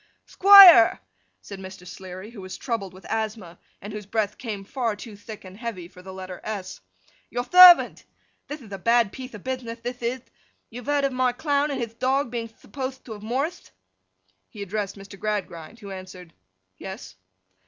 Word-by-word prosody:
'Thquire!' 380 Hz, -, +9 dB, 0.4 s
said 200 Hz, -, -10 dB
Mr. 190 Hz, -1 st, -11 dB
Sleary, 185 Hz, +3 st, -10 dB
who 220 Hz, -5 st, -11 dB
was 185 Hz, 0 st, -8 dB
troubled 225 Hz, -7 st, -4 dB
with 185 Hz, +1 st, -16 dB
asthma, 215 Hz, -5 st, -4 dB, 0.2 s
and 205 Hz, +1 st, -7 dB
whose 210 Hz, -2 st, -8 dB
breath 210 Hz, -1 st, -2 dB
came 215 Hz, -5 st, -6 dB
far 230 Hz, -1 st, -2 dB
too 210 Hz, 0 st, -11 dB
thick 205 Hz, 0 st, -11 dB
and 185 Hz, 0 st, -11 dB
heavy 215 Hz, -6 st, -6 dB
for 180 Hz, 0 st, -16 dB
the 190 Hz, +1 st, -10 dB
letter 185 Hz, -1 st, -9 dB
s, 205 Hz, -4 st, -6 dB, 0.5 s
'Your 245 Hz, +1 st, -3 dB
thervant! 360 Hz, +5 st, +7 dB, 0.4 s
Thith 295 Hz, -1 st, -8 dB
ith 210 Hz, -, -15 dB
a 195 Hz, -, -6 dB
bad 230 Hz, +1 st, +2 dB
piethe 255 Hz, -3 st, -9 dB
of 205 Hz, -, -11 dB
bithnith, 240 Hz, -3 st, -5 dB
thith 245 Hz, +1 st, -6 dB
ith. 240 Hz, +2 st, -4 dB, 0.4 s
You've 245 Hz, +3 st, -9 dB
heard 290 Hz, -1 st, +1 dB
of 270 Hz, -, -1 dB
my 255 Hz, -1 st, +1 dB
Clown 285 Hz, +1 st, 0 dB
and 275 Hz, -2 st, -3 dB
hith 230 Hz, -1 st, -6 dB
dog 265 Hz, -1 st, 0 dB
being 235 Hz, -2 st, -4 dB
thuppothed 260 Hz, +3 st, -8 dB
to 235 Hz, -, -11 dB
have 210 Hz, -, -11 dB
morrithed?' 265 Hz, +10 st, -3 dB, 0.8 s
He 205 Hz, -, -8 dB
addressed 200 Hz, 0 st, -4 dB
Mr. 195 Hz, 0 st, -13 dB
Gradgrind, 200 Hz, -3 st, -4 dB
who 200 Hz, -1 st, -9 dB
answered 185 Hz, -2 st, -10 dB, 0.4 s
'Yes. 190 Hz, -, -9 dB
220 Hz, 180 wpm, -24 LUFS, 195-255 Hz, 0.8 s, Thquire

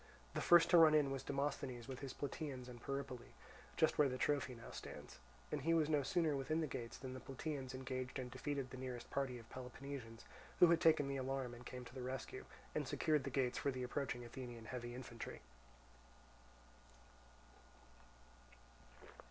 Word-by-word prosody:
The -, -, -1 dB
first 170 Hz, 0 st, +7 dB
to 175 Hz, -, +9 dB
run 155 Hz, -2 st, +9 dB
in 145 Hz, -3 st, +4 dB
was 135 Hz, -1 st, -2 dB
Demosthenes 135 Hz, -3 st, -2 dB
with 130 Hz, -1 st, -5 dB
his 135 Hz, -2 st, -4 dB
Plataeans 140 Hz, -3 st, -4 dB
and 120 Hz, -2 st, -9 dB
Peripoli, 135 Hz, -3 st, -4 dB, 0.4 s
just 160 Hz, -, +4 dB
where 145 Hz, -2 st, +6 dB
the 130 Hz, -, -2 dB
trophy 140 Hz, -2 st, +1 dB
now 115 Hz, -, -9 dB
stands; -, -, -8 dB, 0.3 s
and 150 Hz, -, -1 dB
he 165 Hz, +4 st, +3 dB
was 155 Hz, -2 st, +3 dB
no 150 Hz, -2 st, +4 dB
sooner 160 Hz, 0 st, +2 dB
within 140 Hz, +4 st, 0 dB
the 160 Hz, -, +2 dB
gates 120 Hz, -5 st, -5 dB
than 130 Hz, -1 st, -6 dB
the 130 Hz, -, -5 dB
Plataeans 135 Hz, 0 st, -4 dB
engaged 130 Hz, 0 st, -3 dB
and 125 Hz, -2 st, -4 dB
defeated 140 Hz, -3 st, -2 dB
the 130 Hz, -, -6 dB
nearest 125 Hz, -2 st, -5 dB
party 135 Hz, -2 st, 0 dB
of 115 Hz, -1 st, -11 dB
Peloponnesians 125 Hz, -2 st, -7 dB, 0.3 s
who -, -, +10 dB
had 170 Hz, -, +5 dB
taken 155 Hz, -3 st, +6 dB
the 140 Hz, 0 st, -1 dB
alarm 130 Hz, -1 st, -1 dB
and 120 Hz, +1 st, -9 dB
come 125 Hz, -1 st, -6 dB
to 120 Hz, -, -11 dB
the 130 Hz, -, -5 dB
rescue, 130 Hz, +1 st, -4 dB, 0.3 s
and -, -, -1 dB
secured 150 Hz, -3 st, +2 dB
the -, -, -1 dB
gates 130 Hz, -2 st, +1 dB
for -, -, +1 dB
the 130 Hz, -2 st, -2 dB
approaching 125 Hz, -1 st, -2 dB
Athenian 120 Hz, -2 st, -7 dB
heavy 120 Hz, 0 st, -5 dB
infantry. 120 Hz, -, -7 dB
130 Hz, 175 wpm, -40 LUFS, 125-145 Hz, 0.4 s, who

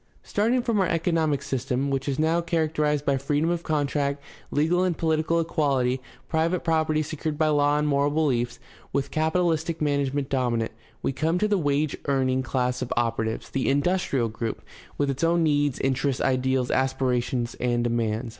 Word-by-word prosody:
Starting 235 Hz, +4 st, +1 dB
from 230 Hz, -4 st, +1 dB
our 190 Hz, -, +3 dB
economic 160 Hz, -4 st, +1 dB
system, 135 Hz, 0 st, -1 dB
which 135 Hz, +1 st, -1 dB
is 135 Hz, -, -1 dB
now 160 Hz, +2 st, +2 dB
char 170 Hz, -2 st, 0 dB
acterized 150 Hz, -1 st, 0 dB
by 140 Hz, -1 st, +2 dB
freedom 145 Hz, +5 st, 0 dB
of 175 Hz, -1 st, -1 dB
contract, 145 Hz, -2 st, 0 dB, 0.3 s
legal 165 Hz, +5 st, +2 dB
and 180 Hz, -3 st, 0 dB
political 160 Hz, +1 st, +1 dB
equahty, 135 Hz, -6 st, +1 dB, 0.3 s
private 165 Hz, +2 st, 0 dB
property 160 Hz, -1 st, +1 dB
secured 155 Hz, 0 st, -4 dB
by 155 Hz, 0 st, +2 dB
law 145 Hz, 0 st, +3 dB
and 150 Hz, 0 st, +1 dB
moral 140 Hz, 0 st, +2 dB
beliefs, 130 Hz, -6 st, 0 dB, 0.3 s
with 140 Hz, -1 st, -1 dB
capitalistic 160 Hz, 0 st, 0 dB
management 140 Hz, -2 st, 0 dB
dominant, 120 Hz, -4 st, 0 dB, 0.3 s
we -, -, +1 dB
come 160 Hz, +5 st, 0 dB
to 210 Hz, -, +2 dB
the 210 Hz, -, +2 dB
wage 145 Hz, -3 st, 0 dB
earning 130 Hz, -2 st, +1 dB
class 125 Hz, -1 st, -1 dB
of 125 Hz, -, -4 dB
operatives, 115 Hz, -1 st, -1 dB
the 135 Hz, -, 0 dB
"industrial 140 Hz, -4 st, +1 dB
group," 110 Hz, +1 st, -4 dB, 0.3 s
with 140 Hz, -1 st, +1 dB
its 135 Hz, +3 st, -4 dB
own 170 Hz, 0 st, +3 dB
needs, 145 Hz, -3 st, +2 dB
interests, 135 Hz, 0 st, 0 dB
ideals, 130 Hz, -1 st, +1 dB
aspirations, 125 Hz, -2 st, 0 dB
and 120 Hz, -1 st, +1 dB
demands. 115 Hz, 0 st, -1 dB
145 Hz, 165 wpm, -25 LUFS, 130-160 Hz, 0.3 s, our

